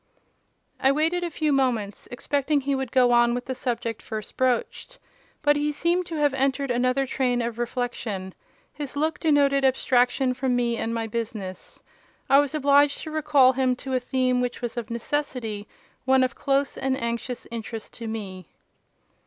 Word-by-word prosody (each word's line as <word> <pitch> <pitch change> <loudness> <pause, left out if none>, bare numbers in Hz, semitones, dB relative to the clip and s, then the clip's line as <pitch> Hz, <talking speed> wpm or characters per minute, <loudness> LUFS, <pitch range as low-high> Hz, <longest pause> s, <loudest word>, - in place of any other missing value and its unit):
I 265 - +4
waited 325 +5 +1
a 345 - -1
few 305 -2 0
moments, 235 -7 0
expecting 285 +3 0
he 280 +1 -1
would 265 -3 -2
go 250 -2 +4
on 240 0 +4
with 245 - -4
the 260 - -3
subject 235 -3 -3
first 215 -2 -6
broached: 260 - -1 0.5
but 290 0 +4
he 295 +1 0
seemed 345 +4 0
to 330 - -5
have 295 -2 +2
entered 270 0 0
another 255 +2 +1
train 250 -2 0
of 235 -1 -3
reflection: 235 -6 -3 0.4
his 290 -2 -6
look 310 +3 0
denoted 280 -3 +3
abstraction 255 0 +2
from 255 0 0
me 240 -1 +1
and 230 - -2
my 230 -1 -2
business. 215 -4 -6 0.5
I 275 - +8
was 290 +1 0
obliged 285 0 +4
to 315 - -6
recall 290 -4 +4
him 255 -1 +1
to 265 +1 -6
a 255 - +2
theme 255 0 0
which 245 -1 -2
was 240 -2 -4
of 240 -3 -4
necessity 235 -4 -3 0.4
one 265 0 +4
of 255 - 0
close 275 0 0
and 265 0 0
anxious 235 +1 -3
interest 225 -1 -6
to 230 - -7
me. 190 -6 -6
255 Hz, 170 wpm, -25 LUFS, 235-280 Hz, 0.5 s, I